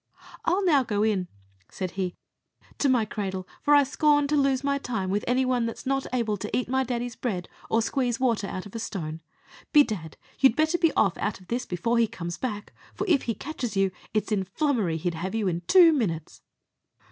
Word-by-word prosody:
"I'll 375 +3 +2
now 295 -6 +5
go 210 -4 0
in," 200 -5 +1 0.4
said 185 -2 -4
he 185 -1 -3 0.6
"to 280 - +3
my 245 -4 +3
cradle; 190 -3 -4
for 290 - +5
I 285 - +7
scorn 290 +1 +3
to 300 - +2
lose 275 -2 +2
my 280 0 +1
time 220 -8 -3
with 205 +1 0
any 255 +2 +2
one 250 -2 +1
that's 230 - -7
not 270 0 0
able 230 -4 0
to 210 +2 -3
eat 250 - -1
my 265 +2 +1
daddy's 245 -1 -3
bread, 190 -8 -3 0.2
or 225 0 +2
squeeze 245 -1 -1
water 235 -6 +1
out 185 - -5
of 205 - -12
a 230 - -4
stone. 165 -7 -5 0.5
Bedad, 215 - +3 0.2
you 270 - +7
had 225 - -5
better 315 +3 +2
be 330 -3 +4
off 195 -4 +2
out 210 - -2
of 185 - -19
this 245 +1 -2
before 230 +7 0
he 230 - +4
comes 175 -6 -6
back; 210 -5 -4 0.2
for - - -2
if 320 -7 +3
he 230 - 0
catches 245 -5 -5
you, 195 -1 +3 0.2
it's 215 0 -1
in 200 -3 +1
flummery 200 - 0
he'd 170 +2 -2
have 185 +6 -4
you 220 -3 0
in 175 -1 -1
two 350 -4 +7
minutes." 170 - -2
230 Hz, 215 wpm, -26 LUFS, 190-270 Hz, 0.6 s, I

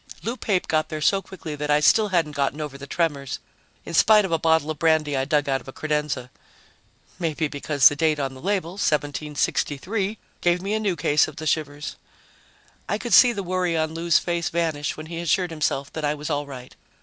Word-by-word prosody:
Lou 230 +2 -2
Pape 200 -7 -1
got 155 -1 0
there 155 -2 -4
so 195 +6 +2
quickly 175 -5 -8
that 150 0 -4
I 150 0 +4
still 210 +8 +4
hadn't 170 -6 +1
gotten 140 +1 -1
over 150 -3 -5
the 140 0 -9
tremors, 145 -6 -1 0.5
in - - -7
spite 210 +4 +6
of 190 - -5
a 165 - +2
bottle 160 -1 +2
of 155 - -7
brandy 155 -3 +2
I 135 0 0
dug 145 0 +1
out 135 -1 0
of - - -19
a - - -6
credenza, 150 -4 -2 0.9
maybe 160 -2 -1
because 145 -1 +3
the 145 - +3
date 155 -1 +1
on 135 -2 -2
the 130 - -12
label, 190 -3 -1
1763, 150 +4 -1 0.2
gave 175 0 +2
me 195 +3 -3
a 220 - +1
new 200 -4 0
case 150 -1 +2
of 155 - -9
the 155 - -7
shivers. 145 -1 -2 0.9
I 205 - +1
could 240 +2 -3
see 245 - +8
the 200 -4 -4
worry 180 -2 0
on 160 0 -1
Lou's 165 0 +2
face 170 -1 -1
vanish 160 -4 -1
when 155 - -7
he 165 +1 -6
assured 170 +1 +1
himself 145 -3 -2
that 155 - -5
I 150 0 +1
was 150 +1 -5
all 145 0 -1
right. 130 -2 -10
155 Hz, 215 wpm, -24 LUFS, 145-175 Hz, 0.9 s, see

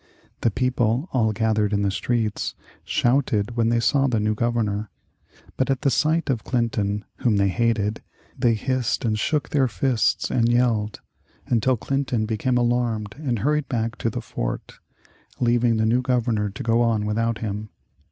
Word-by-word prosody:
The - - +3
people, 125 - 0
all 115 -4 +2
gathered 110 -1 +1
in 100 0 +1
the 100 - +1
streets, 110 +1 -1 0.3
shouted 120 -4 +1
when 115 -1 +2
they 120 0 +2
saw 135 +4 +2
the 120 -4 +1
new 105 +1 +1
Governor. 110 -2 -1 0.7
But 130 - 0
at 135 -1 0
the 140 - +3
sight 160 +4 +1
of 120 -4 -2
Clinton, 105 -4 -1
whom 115 -4 +1
they 100 0 +3
hated, 110 0 0 0.3
they 120 -3 +2
hissed 130 +2 -1
and 110 -1 0
shook 150 +5 0
their 135 -3 +2
fists 125 -1 0
and 115 -1 +2
yelled, 115 -4 +1 0.4
until 125 +2 +2
Clinton 130 -3 -1
became 115 +3 0
alarmed 120 -4 0
and 130 -6 -1
hurried 150 +5 0
back 115 -2 -1
to 115 - -1
the - - -4
fort, - - -5 0.6
leaving 120 -1 +2
the 110 - +2
new 120 +3 +3
Governor 120 -5 0
to 100 - -7
go 115 +1 +2
on 115 -3 +1
without 115 +2 0
him. 105 0 -4
115 Hz, 165 wpm, -23 LUFS, 110-125 Hz, 0.7 s, The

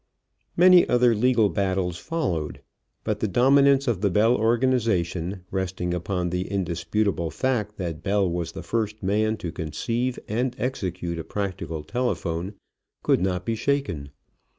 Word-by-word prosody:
Many 180 0 +7
other 125 -1 +4
legal 115 0 +3
battles 95 -2 -1
followed, 105 - -3 0.4
but - - -1
the 110 - 0
dominance 140 +5 +4
of 110 -6 0
the 100 - +3
Bell 110 +6 +4
organization, 110 -7 0
resting 95 -2 -2
upon 90 0 -2
the 90 0 -2
indisputable 90 0 -1
fact 105 - -1
that 85 -4 -4
Bell 100 -1 +1
was 85 -1 -3
the - - -7
first 110 -2 -2
man 110 +3 +1
to 85 -5 -5
conceive 115 - -2
and 120 +4 -1
execute 90 -9 -3
a - - -4
practical 90 -6 -4
telephone, 95 -3 -2 0.5
could - - +3
not 90 -1 -1
be 115 - 0
shaken. 125 - -1
100 Hz, 140 wpm, -25 LUFS, 90-120 Hz, 0.5 s, Many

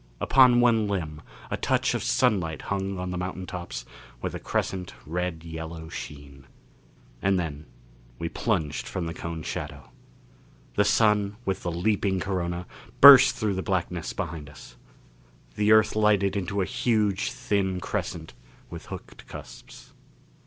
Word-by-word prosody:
Upon 125 -2 +6
one 115 -3 +3
limb 80 -7 -3 0.3
a - - -1
touch - - +1
of - - -1
sunlight 80 -6 +1
hung 95 0 -2
on 90 0 -4
the 90 - -3
mountain 90 0 -4
tops 90 -1 -6 0.3
with - - -4
a - - -5
crescent 90 -2 -3
red 85 0 -3
yellow 80 0 -7
sheen. 70 -3 -9 0.7
And 95 0 +2
then 75 -3 -5 0.5
we 85 - -3
plunged 75 - -2
from 90 - -3
the 80 - -4
cone 85 -2 -6
shadow. - - -6 0.8
The 105 - +3
Sun 105 -1 +3
with 95 -1 -1
the 90 - -2
leaping 95 +2 0
corona, 90 -2 -2 0.3
burst 135 -1 +10
through 105 -3 -1
the 95 - -2
blackness 90 -3 -2
behind 80 -7 -5
us. 70 -4 -14 0.8
The 105 - +2
Earth 110 -1 +5
lighted 105 -2 +3
into 100 +1 -1
a - - +1
huge, 105 -3 0
thin 95 -3 -1
crescent 80 - -4 0.4
with - - -9
hooked - - -10
cusps. - - -12
95 Hz, 145 wpm, -26 LUFS, 80-105 Hz, 0.8 s, burst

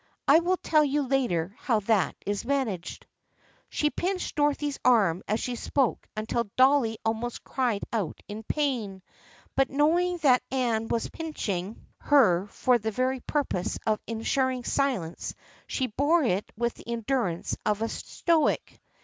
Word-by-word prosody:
I 300 +4 +7
will 360 +2 +1
tell 310 -3 +3
you 290 0 +1
later 240 -10 0
how 225 -5 +1
that 210 -1 +1
is 205 0 -2
managed." 235 -9 -2 0.6
She 300 0 0
pinched 370 +1 -2
Dorothy's 290 -1 0
arm 200 -9 +4
as 215 +2 0
she 250 - -3
spoke 265 +1 0
until 220 +1 -1
Dolly 260 -4 +4
almost 225 +2 -2
cried 240 -6 -1
out 210 -7 -2
in 210 +1 -6
pain, 225 -8 -2 0.5
but 270 0 +3
knowing 340 +6 +2
that 255 -3 +5
Anne 235 -4 0
was 230 - -1
pinching 215 - -4
her 210 -10 +4
for 245 +3 +2
the 220 +1 -2
very 255 +4 0
purpose 255 -10 -2
of 215 -1 +1
en 225 -1 -4
suring 260 -1 0
silence 245 -13 -1 0.3
she 260 - -1
bore 290 +8 +2
it 205 -5 0
with 235 0 0
the - - -15
endurance 235 -6 -1
of 210 +1 0
a - - 0
stoic. 330 +6 0
245 Hz, 150 wpm, -27 LUFS, 215-280 Hz, 0.6 s, I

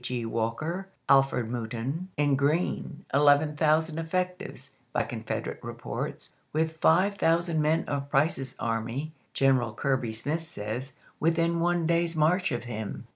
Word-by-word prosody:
Gr. 120 -2 -2
Walker, 115 +12 -2 0.2
Alfred 135 -4 +4
Mouton, 125 +8 -3
and 145 -1 +3
Green, 150 +3 0
eleven 145 +2 +5
thou 155 +1 +4
sand 160 0 -6
effectives, 180 +3 -3 0.2
by - - +2
Confederate - - -4
reports, - - -5 0.2
with 160 +1 0
five 185 +6 +3
thousand 165 -1 +2
men 155 +2 +2
of 140 -1 -3
Price's 135 -2 +1
army, 115 +6 -2 0.2
General 130 -5 +3
Kirby 130 -4 0
Smith 145 +9 -2
says, 130 -4 -5 0.3
within 165 +1 +2
one 175 0 +2
day's 170 0 +1
march 175 +3 +3
of 120 - -2
him. 110 -4 -5
150 Hz, 135 wpm, -28 LUFS, 125-165 Hz, 0.3 s, eleven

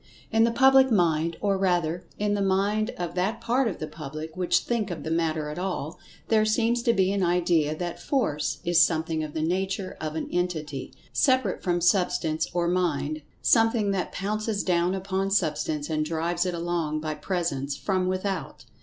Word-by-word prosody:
In 225 0 +4
the 230 - +2
public 265 +2 +6
mind—or 170 +1 +1
rather, 175 -2 0
in 205 0 0
the 205 - 0
mind 200 +3 +1
of 175 -1 -4
that 195 +6 -1
part 240 +2 +1
of - - -3
the - - -4
public 155 +1 -7
which 175 -1 +2
think 230 -4 -1
of 175 -3 -5
the 160 - -4
matter 160 -2 0
at 150 - -5
all—there 190 +4 -2
seems 230 +2 +1
to 235 - +3
be 190 -3 +2
an 200 0 0
idea 170 -4 +2
that 175 0 -4
"Force" 150 - 0
is 175 0 +5
something 160 -1 +1
of 150 -1 -7
the 155 - -1
nature 190 +3 -2
of 155 0 -4
an 160 - -3
entity, 160 -6 -2 0.2
separate 260 -8 +2
from 175 -1 0
Substance 175 -3 +1
or 175 -1 0
Mind—something 180 - +1
that 190 -3 -2
pounces 215 +1 -2
down 180 0 +1
upon 195 0 -2
Substance 155 -5 0
and 155 -1 0
drives 170 +3 -1
it 180 - -2
along 170 -3 -1
by 155 0 -3
presence 150 -3 -2
from 185 -2 0
without. 185 +1 -3
180 Hz, 170 wpm, -26 LUFS, 160-200 Hz, 0.2 s, public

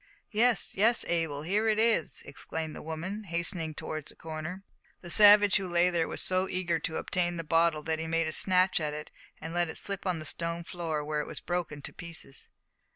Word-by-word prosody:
"Yes, 230 +1 +3
yes, 225 +4 +4
Abel, 160 -4 -1
here 205 +6 +1
it 215 -1 +2
is," 225 -7 +1
exclaimed 155 +3 -5
the - - -8
woman, 175 +7 -5
hastening 170 -2 -2
towards 155 -1 -5
the - - -10
corner. 165 +4 -7 0.4
The 175 - -4
savage 205 0 +8
who 195 -2 -3
lay 175 +1 +3
there 165 -2 0
was - - -4
so 185 +1 +1
eager 175 -3 -1
to 160 +1 -3
obtain 175 -1 -1
the 165 - -4
bottle 165 -1 +2
that 160 0 -2
he 160 - -3
made 165 0 +1
a 160 - -2
snatch 185 +2 +3
at 150 -2 -2
it 150 0 -8 0.3
and 160 +1 -7
let 175 -1 +1
it - - -5
slip 200 -1 -2
on 180 -2 0
the 155 - -7
stone 170 +2 -1
floor, 165 -4 -4
where 150 0 -1
it - - -7
was - - -5
broken 175 -5 -4
to - - -7
pieces. 165 -6 -8
170 Hz, 215 wpm, -29 LUFS, 160-185 Hz, 0.4 s, savage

